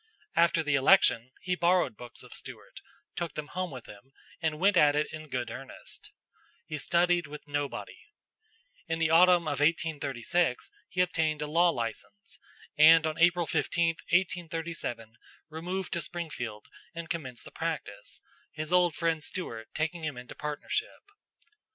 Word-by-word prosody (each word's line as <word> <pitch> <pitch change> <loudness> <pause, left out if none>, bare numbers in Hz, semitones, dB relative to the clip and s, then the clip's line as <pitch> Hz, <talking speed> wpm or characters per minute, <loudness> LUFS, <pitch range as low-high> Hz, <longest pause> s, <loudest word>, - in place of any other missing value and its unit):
After 170 -1 +4
the 150 -2 0
election, 135 -4 +5
he 180 - -1
borrowed 175 -8 +2
books 120 +2 -11
of - - -12
Stuart, - - -6 0.3
took 170 -1 -3
them 150 -1 -5
home 185 0 -3
with 130 -5 -9
him, 105 +7 -14 0.3
and 160 -2 0
went 195 +4 +3
at 145 -4 +6
it 150 +1 +2
in 155 -1 -8
good 125 -2 -3
earnest. 135 0 -7 0.6
He 155 - -5
studied 175 0 +2
with 150 0 -10
nobody.... 145 -1 -4 0.8
In 165 - -1
the 165 -1 +1
autumn 175 +1 +6
of 145 -4 -2
1836 150 - 0 0.2
he 180 - +1
obtained 160 -4 +1
a - - -1
law 170 +4 +4
license, 165 - -5 0.4
and 160 +1 +8
on 160 +1 -2
April 170 0 +4
15, 170 +1 +1 0.2
1837, 165 -10 -1 0.3
removed 175 +3 -4
to 170 - -1
Springfield 125 -13 -5 0.3
and 170 0 -5
commenced 130 -8 -5
the - - -11
practice, - - -4 0.3
his 155 +2 -5
old 175 -3 +4
friend 165 -2 0
Stuart 115 - -5
taking 160 +2 -2
him 150 -5 -3
into 125 0 -8
partnership." 150 - -4
160 Hz, 150 wpm, -29 LUFS, 145-175 Hz, 0.8 s, and